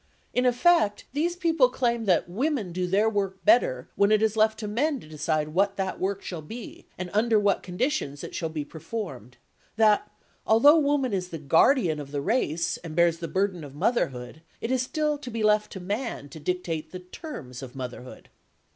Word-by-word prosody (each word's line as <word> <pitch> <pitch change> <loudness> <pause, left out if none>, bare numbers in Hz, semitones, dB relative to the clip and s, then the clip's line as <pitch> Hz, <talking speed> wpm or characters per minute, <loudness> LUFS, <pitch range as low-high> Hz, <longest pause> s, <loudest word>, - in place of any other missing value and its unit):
In 250 0 +2
effect 245 -4 +3
these 335 +5 0
people 325 -7 +3
claim 235 -3 0
that 180 -5 +2
women 225 - -1
do 180 +1 -2
their 200 +4 +3
work 195 -3 -2
better 130 - +3
when 200 +1 +3
it 215 0 +4
is 220 -1 +2
left 220 0 +3
to 215 - -5
men 275 +7 0
to 155 - -14
decide 155 0 -1
what 195 +5 +1
that 190 -1 -2
work 195 +1 -2
shall 175 -4 -5
be 225 +10 -10
and 180 -1 -5
under 220 +1 +3
what 200 -1 +2
conditions 180 - -2
it - - -7
shall 165 - -2
be 155 -2 -4
performed; 145 - -7 0.4
that, 210 -1 +3 0.3
although 285 +9 +6
woman 280 -5 +1
is 180 -2 -2
the 165 - -5
guardian 160 - +3
of 145 -2 -7
the 145 -1 -2
race, 165 - 0
and 165 -3 -9
bears 170 -1 +3
the 170 - -4
burden 185 -2 -1
of 140 -1 -10
motherhood, 135 - -1 0.2
it 230 - -3
is 260 -1 +2
still 300 +3 -1
to 255 - -7
be 225 -2 -3
left 210 0 +3
to 190 - -6
man 200 - -4
to 160 - -10
dictate 165 -1 -3
the 185 - -7
terms 170 - -9
of 130 -1 -9
motherhood. 125 -1 -8
200 Hz, 195 wpm, -26 LUFS, 160-235 Hz, 0.4 s, although